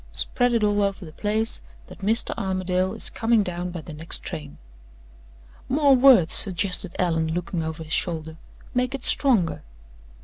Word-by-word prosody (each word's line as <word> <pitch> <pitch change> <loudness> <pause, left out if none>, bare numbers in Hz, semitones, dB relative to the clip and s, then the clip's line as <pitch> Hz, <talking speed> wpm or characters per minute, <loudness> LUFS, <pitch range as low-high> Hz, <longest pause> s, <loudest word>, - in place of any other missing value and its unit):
Spread 245 -1 +1
it 225 - +1
all 205 0 +1
over 200 -1 -2
the 155 - -11
place 215 +6 -2 0.2
that - - -14
Mr. 220 +4 +2
Armadale 185 0 -2
is 225 - +2
coming 225 -2 +1
down 180 -1 -4
by 175 -2 -7
the 155 - -11
next 160 +2 +3
train." 150 -5 -8 1.1
"More 280 0 +4
words!" 245 -10 +5
suggested 190 -1 +1
Allan, 165 -2 -1
looking 175 -1 -3
over 160 0 -5
his 155 -1 -5
shoulder. 160 -2 -3 0.4
"Make 250 +1 -1
it 270 - -7
stronger." 230 - +1
190 Hz, 160 wpm, -23 LUFS, 165-225 Hz, 1.1 s, words